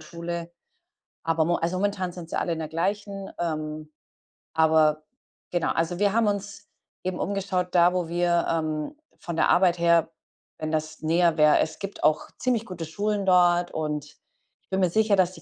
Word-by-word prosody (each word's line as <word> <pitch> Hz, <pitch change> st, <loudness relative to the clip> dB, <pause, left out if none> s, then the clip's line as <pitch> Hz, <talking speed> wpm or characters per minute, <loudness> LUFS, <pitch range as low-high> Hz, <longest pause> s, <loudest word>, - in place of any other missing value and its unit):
Schule. 170 Hz, +1 st, -6 dB, 0.7 s
Aber 165 Hz, -1 st, +1 dB
mo 175 Hz, -, +1 dB
also, 170 Hz, +2 st, -1 dB
momentan 190 Hz, -2 st, -1 dB
sind 170 Hz, -2 st, -9 dB
sie -, -, -3 dB
alle 170 Hz, -, 0 dB
in 165 Hz, -, -3 dB
der 155 Hz, -, -4 dB
gleichen. 195 Hz, +4 st, -3 dB
Ähm, 155 Hz, -2 st, -4 dB, 0.6 s
aber 155 Hz, -1 st, +3 dB, 0.5 s
genau 175 Hz, -2 st, 0 dB
also, 170 Hz, +2 st, -1 dB
wir 205 Hz, -1 st, +3 dB
haben 230 Hz, -1 st, +3 dB
uns 205 Hz, 0 st, -3 dB, 0.4 s
eben 185 Hz, 0 st, -3 dB
umgeschaut, 190 Hz, -2 st, -1 dB
da 175 Hz, +1 st, +5 dB
wo 180 Hz, -2 st, -1 dB
wir, 175 Hz, 0 st, +1 dB
ähm, 155 Hz, -, -2 dB, 0.2 s
von 170 Hz, -2 st, -5 dB
der -, -, +2 dB
Arbeit 175 Hz, -1 st, +4 dB
her, 170 Hz, -1 st, +3 dB, 0.5 s
wenn 155 Hz, 0 st, -4 dB
das 155 Hz, 0 st, -3 dB
näher 170 Hz, +1 st, +3 dB
wäre 150 Hz, -1 st, +5 dB
es 160 Hz, -, -1 dB
gibt 195 Hz, 0 st, -7 dB
auch 155 Hz, +1 st, +2 dB
ziemlich 240 Hz, -3 st, 0 dB
gute 170 Hz, -3 st, -6 dB
Schulen 205 Hz, +5 st, -2 dB
dort 175 Hz, -1 st, +4 dB
und 150 Hz, -2 st, -3 dB, 0.6 s
ich -, -, -44 dB
bin 190 Hz, -, 0 dB
mir 185 Hz, -2 st, +3 dB
sicher, 215 Hz, +2 st, +3 dB
dass 185 Hz, -1 st, +2 dB
die 165 Hz, -, -13 dB
175 Hz, 180 wpm, -25 LUFS, 160-190 Hz, 0.7 s, da